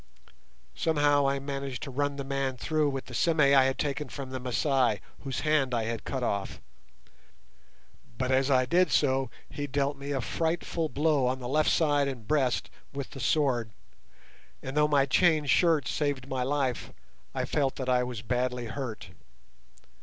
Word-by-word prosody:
Somehow 145 Hz, -3 st, +2 dB
I 140 Hz, -, 0 dB
managed 135 Hz, -2 st, -5 dB
to 140 Hz, -, -6 dB
run 145 Hz, +2 st, -1 dB
the 140 Hz, -, -4 dB
man 135 Hz, -1 st, -2 dB
through 155 Hz, +2 st, +1 dB
with 135 Hz, -1 st, -4 dB
the 125 Hz, -, -11 dB
sime 160 Hz, +6 st, +1 dB
I 140 Hz, -2 st, +6 dB
had 135 Hz, 0 st, 0 dB
taken 145 Hz, -1 st, -2 dB
from 130 Hz, +2 st, -7 dB
the 130 Hz, -, -4 dB
Masai 125 Hz, -2 st, +1 dB, 0.2 s
whose 135 Hz, -3 st, -4 dB
hand 150 Hz, -5 st, +2 dB
I 115 Hz, -, 0 dB
had 115 Hz, 0 st, -4 dB
cut 130 Hz, -2 st, -3 dB
off; 100 Hz, -4 st, -2 dB, 1.6 s
but 130 Hz, +1 st, -1 dB
as 130 Hz, +1 st, +2 dB
I 130 Hz, -2 st, +4 dB
did 180 Hz, +7 st, +3 dB
so, 130 Hz, -1 st, +2 dB, 0.2 s
he 145 Hz, 0 st, -5 dB
dealt 140 Hz, +1 st, -1 dB
me 140 Hz, +1 st, -6 dB
a 140 Hz, -2 st, 0 dB
frightful 165 Hz, -, -1 dB
blow 145 Hz, -3 st, +2 dB
on 130 Hz, +1 st, 0 dB
the 125 Hz, -2 st, -6 dB
left 155 Hz, +4 st, +2 dB
side 145 Hz, -3 st, +2 dB
and 125 Hz, -5 st, -6 dB
breast 135 Hz, -5 st, +1 dB, 0.2 s
with 140 Hz, -2 st, -6 dB
the 135 Hz, -, -9 dB
sword, 125 Hz, -3 st, +1 dB, 0.9 s
and 135 Hz, +1 st, -5 dB
though 150 Hz, 0 st, +4 dB
my 140 Hz, -2 st, +3 dB
chain 155 Hz, +1 st, +3 dB
shirt 155 Hz, -2 st, +3 dB
saved 140 Hz, -3 st, -1 dB
my 130 Hz, -2 st, -2 dB
life, 130 Hz, -1 st, -1 dB, 0.4 s
I -, -, -1 dB
felt 135 Hz, -2 st, 0 dB
that 130 Hz, -, -5 dB
I 125 Hz, -1 st, +3 dB
was 125 Hz, -3 st, -5 dB
badly 125 Hz, +1 st, -1 dB
hurt. 115 Hz, -7 st, -6 dB
135 Hz, 175 wpm, -28 LUFS, 130-145 Hz, 1.6 s, I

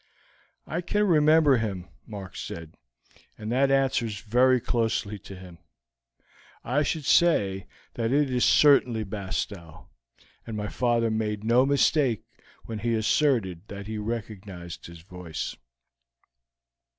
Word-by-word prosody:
"I 170 Hz, -, -3 dB
can 205 Hz, +4 st, 0 dB
remember 155 Hz, -5 st, +5 dB
him," 95 Hz, -6 st, -3 dB, 0.2 s
Mark 100 Hz, -4 st, -8 dB
said; 80 Hz, -1 st, -7 dB, 0.6 s
"and 110 Hz, +1 st, -5 dB
that 135 Hz, +3 st, +3 dB
answers 130 Hz, -6 st, +1 dB
very 125 Hz, +4 st, +3 dB
closely 110 Hz, -3 st, -1 dB
to 95 Hz, -, -11 dB
him. 90 Hz, -2 st, -12 dB, 1.0 s
I 130 Hz, +5 st, 0 dB
should 150 Hz, 0 st, -2 dB
say 100 Hz, -, +3 dB, 0.3 s
that 115 Hz, -1 st, -2 dB
it 145 Hz, -1 st, +2 dB
is 125 Hz, -, +1 dB
certainly 125 Hz, -6 st, +4 dB
Bastow, 95 Hz, -4 st, -6 dB, 0.6 s
and 110 Hz, -2 st, -5 dB
my 105 Hz, 0 st, -3 dB
father 120 Hz, -2 st, +1 dB
made 105 Hz, -1 st, -2 dB
no 120 Hz, +4 st, +4 dB
mistake 140 Hz, -4 st, +2 dB, 0.4 s
when 110 Hz, -2 st, -5 dB
he 115 Hz, +1 st, 0 dB
asserted 110 Hz, -, +1 dB
that 100 Hz, 0 st, -8 dB
he 110 Hz, +1 st, -5 dB
recognized 105 Hz, -6 st, -6 dB
his 85 Hz, -1 st, -12 dB
voice." 90 Hz, -2 st, -6 dB
110 Hz, 125 wpm, -26 LUFS, 100-130 Hz, 1.0 s, remember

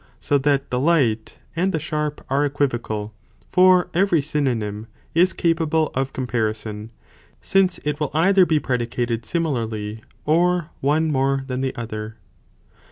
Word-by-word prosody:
So 145 Hz, -, +1 dB
that 140 Hz, 0 st, 0 dB
the 125 Hz, -, 0 dB
light, 130 Hz, -8 st, +1 dB, 0.2 s
and 185 Hz, +3 st, +1 dB
the 160 Hz, -, -1 dB
sharp, 150 Hz, -1 st, -3 dB
are 140 Hz, +2 st, +1 dB
equivocal, 120 Hz, -7 st, -2 dB, 0.4 s
for 180 Hz, -1 st, +5 dB
every 180 Hz, -1 st, +3 dB
synonym 120 Hz, -8 st, -2 dB, 0.3 s
is 180 Hz, +3 st, +4 dB
capable 160 Hz, -2 st, +1 dB
of 135 Hz, +1 st, -1 dB
comparison, 110 Hz, -3 st, -3 dB, 0.5 s
since 190 Hz, -2 st, +2 dB
it 150 Hz, 0 st, -1 dB
will 150 Hz, -3 st, -1 dB
either 185 Hz, +3 st, +5 dB
be 155 Hz, -2 st, +3 dB
predicated 120 Hz, -3 st, -2 dB
similarly, 110 Hz, -8 st, -2 dB, 0.2 s
or 170 Hz, +1 st, +2 dB
one 155 Hz, +3 st, +1 dB
more 135 Hz, 0 st, +1 dB
than 130 Hz, -1 st, -3 dB
the 135 Hz, -1 st, -2 dB
other. 110 Hz, -2 st, -6 dB
140 Hz, 135 wpm, -22 LUFS, 115-160 Hz, 0.5 s, for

